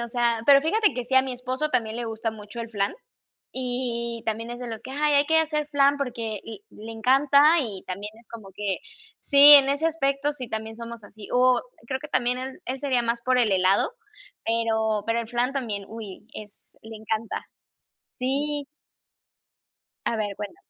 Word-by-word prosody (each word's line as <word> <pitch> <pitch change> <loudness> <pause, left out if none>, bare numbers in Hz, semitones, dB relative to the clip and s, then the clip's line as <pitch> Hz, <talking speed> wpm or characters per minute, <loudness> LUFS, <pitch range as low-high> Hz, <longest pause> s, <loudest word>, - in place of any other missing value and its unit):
o 235 - -4
sea, 235 -1 0
pero 275 0 +7
fíjate 420 +6 +2
que 250 - -3
sí, 255 +2 -3
a 260 - +8
mi 260 0 -4
esposo 255 +4 -2
también 230 -5 -1
le 240 -1 -4
gusta 225 0 -3
mucho 215 +1 -9
el 230 -1 -6
flan, 200 -3 0 0.6
y 240 -2 -3
también 225 +1 -3
es 240 0 -6
de 250 - -6
los 225 -1 -6
que: - - -9
"Ay 295 +1 +1
hay 285 +1 +4
que 320 +2 +3
hacer 305 -2 0
flan 285 -1 +3
porque" 235 -6 -4
y 225 - -10
le 220 +2 -11
encanta. 270 +5 +4 0.2
Y 210 -9 -4
también 200 +3 -6
es 230 - -18
como 215 -4 -10
que 205 -2 -2 0.4
sí, 285 +1 +9
en 275 -1 +6
ese 285 +4 +1
aspecto, 285 -2 0
sí, 260 -4 -7
también 220 0 -5
somos 235 -1 -8
así, 205 0 -12
o, 250 0 +4 0.2
creo 260 +2 -3
que 300 - -9
también 250 -3 0
él 260 +1 -7
él 260 +2 -3
sería 265 -3 +1
más 235 0 -2
por 255 +1 +1
el 230 -4 +3
helado, 190 +1 +3 0.6
pero 220 -2 0
pero 230 +1 0
el 230 - -5
flan 245 +2 0
también, 230 -8 -3
uy, 215 -3 -9
es 210 -1 -13
le 220 0 -10
encanta. 220 +1 -4 0.8
Sí. 285 +3 -1 1.4
A 230 - 0
ver, 205 -2 -2
cuéntame. 210 - -7
240 Hz, 195 wpm, -25 LUFS, 220-275 Hz, 1.4 s, sí